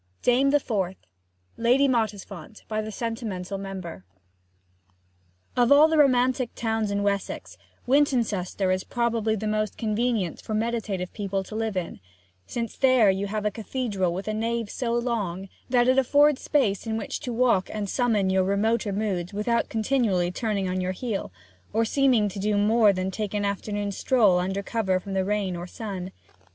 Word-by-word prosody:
DAME 255 +3 +4
THE 290 +1 +4
FOURTH 190 -8 -2 0.6
LADY 250 +4 +4
MOTTISFONT 210 - -3
By 215 0 -1
the 215 0 -6
Sentimental 210 -4 -4
Member 190 - -7 1.5
Of 245 +1 +3
all 290 +2 +8
the 320 -1 +2
romantic 255 -2 +3
towns 225 -2 -1
in 200 0 -1
Wessex, 200 -1 -2 0.3
Wintoncester 230 -9 +1
is 185 0 -2
probably 230 -2 0
the 215 0 -4
most 215 -1 -1
convenient 220 -4 -1
for 215 - -4
meditative 215 -5 -2
people 195 -2 -2
to 210 - -9
live 220 -3 -2
in; 175 -2 -4 0.5
since 230 -1 -4
there 255 -6 +5
you 195 +1 -2
have 210 +1 -3
a 210 - +2
cathedral 210 -4 -2
with 190 +4 -5
a 215 - -1
nave 230 0 -2
so 240 -2 -2
long 210 -6 -2 0.2
that 245 -1 +3
it 260 +1 +5
affords 285 +2 +4
space 225 -8 +1
in 220 0 -1
which - - -4
to 255 -5 -5
walk 235 -5 +2
and 210 -1 -3
summon 210 -4 +1
your 190 0 +3
remoter 205 +3 +1
moods 195 -3 -2
without 235 +3 0
continually 215 -6 +1
turning 200 -1 -1
on 185 0 -1
your 185 0 -1
heel, 205 - -4 0.4
or 225 +1 +2
seeming 250 -3 +3
to 200 0 -6
do 210 +1 +1
more 215 +1 +4
than 185 0 -2
take 210 +1 -4
an 205 -1 0
afternoon 205 0 -2
stroll 205 -4 +3
under 190 +2 -2
cover 195 -4 0
from 195 +1 -7
the 190 -1 +1
rain 200 -2 -1
or 175 +1 -6
sun. 190 -2 -6
215 Hz, 170 wpm, -25 LUFS, 195-235 Hz, 1.5 s, all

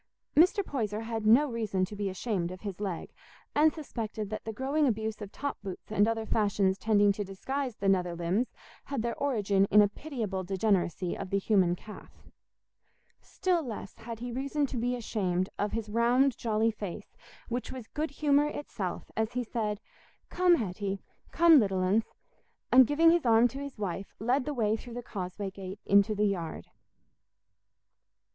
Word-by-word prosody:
Mr. 365 +6 +5
Poyser 215 - -2
had 225 -1 -3
no 255 +7 +6
reason 215 -6 -1
to 205 - -9
be 205 -1 -2
ashamed 185 -2 -2
of 185 0 -9
his 200 -3 -6
leg, 190 -5 -4 0.4
and 310 +1 +5
suspected 220 -9 -5
that 215 - -4
the 225 - -3
growing 275 +6 +1
abuse 220 -2 -2
of 205 -1 -7
top 285 0 -4
boots 195 0 -8
and 210 0 +3
other 225 -1 -1
fashions 200 -3 +1
tending 205 -2 +4
to 205 +1 -3
disguise 250 +6 -4
the 200 - -3
nether 180 -3 +2
limbs 175 +8 0 0.4
had 275 -5 -3
their 235 0 -1
origin 205 -8 +2
in 210 +1 +5
a 205 - +7
pitiable 210 -6 -4
degeneracy 185 -2 0
of 195 - -6
the 195 - +1
human 190 -3 +3
calf. 210 +4 -13 0.9
Still 360 -2 0
less 225 -8 -7
had 230 0 -7
he 245 +2 -5
reason 275 +4 -1
to 265 - -5
be 245 +2 0
ashamed 185 -6 -1
of 205 0 -1
his 225 -1 -2
round 240 +5 +3
jolly 225 0 +1
face, 205 -1 -7 0.3
which 245 +1 -3
was 255 -3 -7
good 305 +7 -3
humour 290 +1 +2
itself 225 -11 -5
as 220 +1 -1
he 250 0 -1
said, 215 -3 -2 0.5
"Come, 360 -1 +5
Hetty—come, 210 - +2
little 195 -4 +1
uns!" 205 +5 +2 0.7
and 255 -1 +8
giving 325 +3 +5
his 340 -1 +2
arm 230 +1 +6
to 270 - -7
his 280 -2 -7
wife, 195 -1 -4
led 250 +5 +1
the 295 - -2
way 220 -3 +2
through 235 +1 -9
the 245 - -5
causeway 195 -1 -5
gate 190 +1 -8
into 200 +2 +4
the 210 +1 +2
yard. 170 - -3
220 Hz, 175 wpm, -30 LUFS, 195-250 Hz, 0.9 s, and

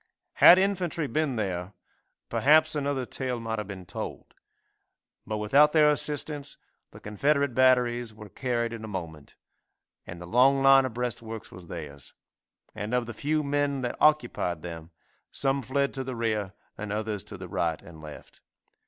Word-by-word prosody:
Had 180 - +9
infantry 185 -4 0
been 145 +1 -1
there, 95 -3 -3 0.5
perhaps 155 +2 +4
another 140 -3 -1
tale 125 -1 -3
might 110 -1 -3
have 105 - -5
been 95 -2 -8
told, - - -7 0.9
but 110 - -2
without 140 +8 +4
their 150 -2 +6
assistance 145 -1 -1 0.3
the - - -14
Confederate 140 +6 0
batteries 120 -2 +3
were 105 0 -12
carried 120 0 -2
in 115 -1 -7
a - - -6
moment, 85 -7 -7 0.7
and 85 0 -8
the 90 - -8
long 130 +7 +4
line 135 -1 +7
of 125 -3 -5
breastworks 115 -2 -5
was 90 -2 -11
theirs, 75 -5 -8 0.6
and 105 +4 -3
of 125 -1 0
the 120 - -7
few 150 +6 -1
men 140 -1 0
that 125 - -3
occupied 120 - +2
them, 85 -2 -8 0.4
some 135 0 0
fled 140 +2 -1
to 135 - -4
the 130 -1 -5
rear 110 -4 -2 0.3
and 105 -1 -5
others 105 -2 -3
to - - -9
the - - -8
right 80 -2 -1
and 80 -2 -13
left. 75 -1 -12
120 Hz, 160 wpm, -27 LUFS, 105-140 Hz, 0.9 s, Had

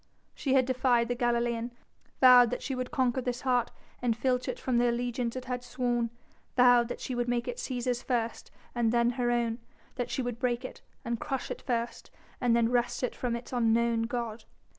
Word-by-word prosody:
She 270 -2 0
had 260 -1 +5
defied 250 -2 +2
the - - +2
Galilean, 235 -1 0 0.5
vowed 250 -2 +8
that - - -4
she 270 - -3
would 255 -1 -3
conquer 260 -3 +1
this 245 0 -3
heart 250 -3 +1 0.3
and 235 -2 +1
filch 250 0 0
it - - -2
from 250 -2 0
the 240 0 +3
allegiance 240 0 -2
it 255 -1 -5
had 250 -1 -3
sworn, 245 -1 -1 0.5
vowed 245 -1 +6
that - - -5
she 255 - -4
would 240 0 -1
make 240 0 -1
it 245 -1 -3
Cæsar's 245 -1 -2
first 235 -3 -2 0.2
and 235 -2 +1
then 235 0 +3
her 245 -1 -1
own, 235 -1 0 0.4
that 245 - -2
she 260 - -2
would 245 -1 -4
break 245 0 0
it - - -8 0.2
and 235 -1 -2
crush 270 -2 -3
it - - -5
first 235 -2 -3 0.3
and 240 -2 +3
then 235 0 +2
wrest 245 +1 0
it 250 - -1
from 245 -2 -2
its 235 +2 -8
unknown 230 -1 +2
God. 235 -2 -4
245 Hz, 205 wpm, -29 LUFS, 235-250 Hz, 0.5 s, vowed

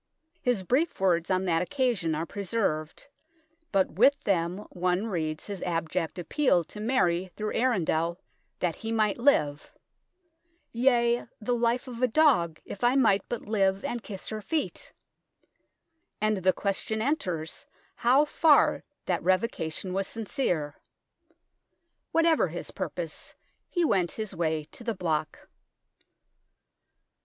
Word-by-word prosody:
His 245 -7 +1
brief 275 - +1
words 175 -3 +2
on 185 0 +1
that 165 -2 +2
occasion 195 - 0
are 160 +2 -2
preserved; 180 -5 -2 0.7
but 195 -2 +2
with 270 - +4
them 180 0 0
one 180 +2 0
reads 160 -7 -3
his 200 -2 -6
abject 165 0 -2
appeal 180 - +2
to 210 - -10
Mary 190 -6 +1
through 215 0 -3
Arundel 170 -8 +1 0.4
that 175 -2 0
he 225 +7 -6
might 215 -1 +1
live 150 - +2 0.5
" 340 0 -46 0.2
yea, 240 -1 +2
the 245 +2 -1
life 240 +2 +1
of 240 -1 -7
a 255 - +4
dog, 225 - +3
if 200 - -8
I 245 +2 +4
might 220 -7 +4
but 240 - -3
live 195 -2 +1
and 240 - -3
kiss 200 -4 -7
her 215 -1 -4
feet" 305 +9 -3 1.3
and 215 0 +1
the 185 0 +3
question 200 +3 -2
enters 185 - -2 0.3
how 260 +5 +4
far 300 0 +4 0.2
that 175 -3 0
revocation 185 -2 -1
was 195 0 -1
sincere. 180 - -2 1.3
Whatever 330 -1 +3
his - - -6
purpose, - - -5 0.3
he 350 -2 +1
went 190 - +1
his 215 -3 -4
way 160 -3 -1
to - - -9
the 230 -2 -2
block. 155 -4 -2
200 Hz, 130 wpm, -28 LUFS, 175-240 Hz, 1.3 s, with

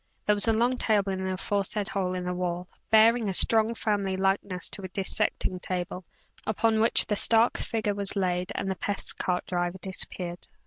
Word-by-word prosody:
There 210 - +3
was 205 +2 +2
a 225 - +3
long 245 +3 0
table 205 -3 +1
in 190 0 -4
the 190 0 -2
aforesaid 200 +2 -2
hole 185 -2 -2
in 180 -1 -5
the 180 - -3
wall, 180 0 -4 0.2
bearing 225 0 +4
a 190 - 0
strong 225 +3 +5
family 200 -4 -2
likeness 195 -1 -1
to - - -2
a 190 - -6
dissecting 185 -1 -1
table; 180 0 -5 0.4
upon 220 +1 +1
which 225 +1 +7
the 210 - -2
stark 225 +3 +3
figure 220 -3 -2
was 200 0 0
laid, 180 -1 -2
and 195 -1 -3
the - - -3
pest 200 +3 -2
cart 180 -1 -2
driver 175 0 -3
disappeared. 180 -2 -4
195 Hz, 190 wpm, -26 LUFS, 180-215 Hz, 0.4 s, which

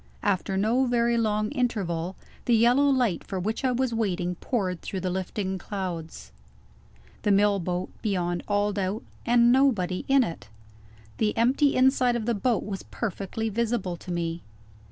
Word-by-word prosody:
After 190 -1 0
no 235 +6 +2
very 235 -1 +2
long 215 -2 0
interval, 190 - -1 0.3
the 240 - +4
yellow 245 +5 +4
light 245 - +1
for 190 - -4
which 220 +8 -2
I 260 - +2
was 250 0 0
waiting 185 -5 -1
poured 185 -2 -2
through 190 - -4
the 185 0 -1
lifting 190 +1 -3
clouds. 170 - -6 0.9
The - - 0
mill 200 0 +4
boat, 180 +1 -3
beyond 175 -5 -1
all 205 0 +1
doubt 200 +2 -2 0.2
and 240 0 +5
nobody 225 -9 +2
in 275 -1 +5
it! 160 - -6 0.7
The 215 -1 +1
empty 270 +5 +3
inside 255 -1 +4
of 230 -2 -2
the 235 - +1
boat 230 +2 0
was 195 -2 -4
perfectly 220 +1 -4
visible 220 -4 -1
to 180 - -8
me. 170 -1 -2
210 Hz, 155 wpm, -26 LUFS, 185-240 Hz, 0.9 s, and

